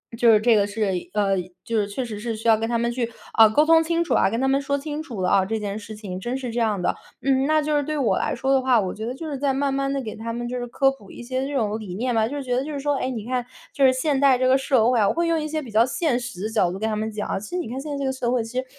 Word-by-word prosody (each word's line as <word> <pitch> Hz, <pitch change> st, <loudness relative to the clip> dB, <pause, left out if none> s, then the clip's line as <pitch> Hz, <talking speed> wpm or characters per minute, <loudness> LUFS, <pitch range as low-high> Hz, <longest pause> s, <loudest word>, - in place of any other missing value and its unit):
就 230 Hz, 0 st, +5 dB
是 215 Hz, -, +6 dB
这 230 Hz, +1 st, +4 dB
个 205 Hz, -1 st, +3 dB
是， 205 Hz, -1 st, -1 dB, 0.2 s
呃， 200 Hz, -2 st, +2 dB, 0.3 s
就 230 Hz, -, -1 dB
是 200 Hz, -, 0 dB
确 245 Hz, +5 st, -4 dB
实 215 Hz, -3 st, -6 dB
是 225 Hz, +1 st, -3 dB
需 225 Hz, +2 st, -5 dB
要 225 Hz, -, +7 dB
跟 225 Hz, +1 st, -2 dB
他 235 Hz, -, +1 dB
们 235 Hz, +1 st, 0 dB
去， 235 Hz, -1 st, -2 dB, 0.2 s
啊， 225 Hz, -1 st, +8 dB
沟 295 Hz, +8 st, +3 dB
通 325 Hz, 0 st, +6 dB
清 335 Hz, +1 st, 0 dB
楚 -, -, -1 dB
啊， -, -, +3 dB
跟 230 Hz, -, -2 dB
他 265 Hz, -, +1 dB
们 275 Hz, +1 st, +2 dB
说 280 Hz, +1 st, -1 dB
清 295 Hz, +1 st, -5 dB
楚 240 Hz, -11 st, -6 dB
了 180 Hz, -, +1 dB
啊， 195 Hz, -1 st, +4 dB
这 220 Hz, +3 st, -2 dB
件 210 Hz, 0 st, -4 dB
事 215 Hz, +1 st, -9 dB
情 195 Hz, -4 st, -6 dB
真 240 Hz, +7 st, -3 dB
是 250 Hz, -3 st, -5 dB
这 235 Hz, -, -2 dB
样 215 Hz, -4 st, +1 dB
的。 -, -, +1 dB, 0.3 s
嗯， 270 Hz, 0 st, +2 dB
那 310 Hz, 0 st, +3 dB
就 300 Hz, 0 st, 0 dB
是 290 Hz, -, +2 dB
对 305 Hz, +1 st, -3 dB
我 260 Hz, -5 st, +1 dB
来 -, -, -1 dB
说 270 Hz, -, -1 dB
的 265 Hz, -, +3 dB
话， 255 Hz, -3 st, +3 dB
我 185 Hz, -, -3 dB
觉 220 Hz, +1 st, -6 dB
得 245 Hz, -, -3 dB
就 325 Hz, -, -7 dB
是 280 Hz, -, -3 dB
在 275 Hz, 0 st, 0 dB
慢 275 Hz, 0 st, 0 dB
慢 275 Hz, 0 st, -1 dB
地， 275 Hz, -, -1 dB
给 215 Hz, -, -5 dB
他 230 Hz, +1 st, -5 dB
们 240 Hz, +1 st, -4 dB
就 250 Hz, -, -3 dB
是 245 Hz, -, -4 dB
科 270 Hz, +3 st, +2 dB
普 210 Hz, -8 st, -14 dB
一 -, -, -10 dB
些 260 Hz, +2 st, -2 dB
这 290 Hz, -, -5 dB
种 220 Hz, -3 st, 0 dB
理 190 Hz, -4 st, -7 dB
念 245 Hz, +5 st, -1 dB
吧， 220 Hz, -1 st, +2 dB
就 285 Hz, -, -5 dB
是 280 Hz, -, -4 dB
觉 250 Hz, -1 st, -2 dB
得 260 Hz, -, 0 dB
就 305 Hz, -, -5 dB
是 280 Hz, -, -3 dB
说， 290 Hz, 0 st, +1 dB
哎， 260 Hz, -, -2 dB
你 225 Hz, -5 st, -5 dB
看 250 Hz, 0 st, -2 dB, 0.3 s
就 275 Hz, -2 st, +3 dB
是 260 Hz, -, +6 dB
现 270 Hz, +1 st, 0 dB
代 270 Hz, -2 st, +5 dB
这 255 Hz, -, 0 dB
个 260 Hz, -, +5 dB
社 260 Hz, -4 st, +2 dB
会 240 Hz, -, +2 dB
啊， 205 Hz, -, +4 dB
我 -, -, +2 dB
会 340 Hz, +1 st, 0 dB
用 330 Hz, -1 st, +1 dB
一 305 Hz, -, -3 dB
些 310 Hz, 0 st, -2 dB
比 245 Hz, -, -10 dB
较 220 Hz, +2 st, +4 dB
现 270 Hz, -2 st, 0 dB
实 240 Hz, -6 st, -7 dB
的 215 Hz, -, -1 dB
角 215 Hz, -5 st, +2 dB
度 185 Hz, -, -5 dB
跟 220 Hz, -, -1 dB
他 215 Hz, -, -1 dB
们 220 Hz, +1 st, -2 dB
讲。 210 Hz, -2 st, -3 dB
其 210 Hz, -, -9 dB
实 360 Hz, -, -2 dB
你 345 Hz, -9 st, -3 dB
看 255 Hz, +3 st, -4 dB
现 300 Hz, -, -7 dB
在 285 Hz, -, -3 dB
这 280 Hz, -, -3 dB
个 265 Hz, -, +1 dB
社 250 Hz, -2 st, -2 dB
会 245 Hz, -3 st, +1 dB
其 230 Hz, +3 st, -7 dB
实 260 Hz, -, -4 dB
245 Hz, 385 characters per minute, -23 LUFS, 220-275 Hz, 0.3 s, 啊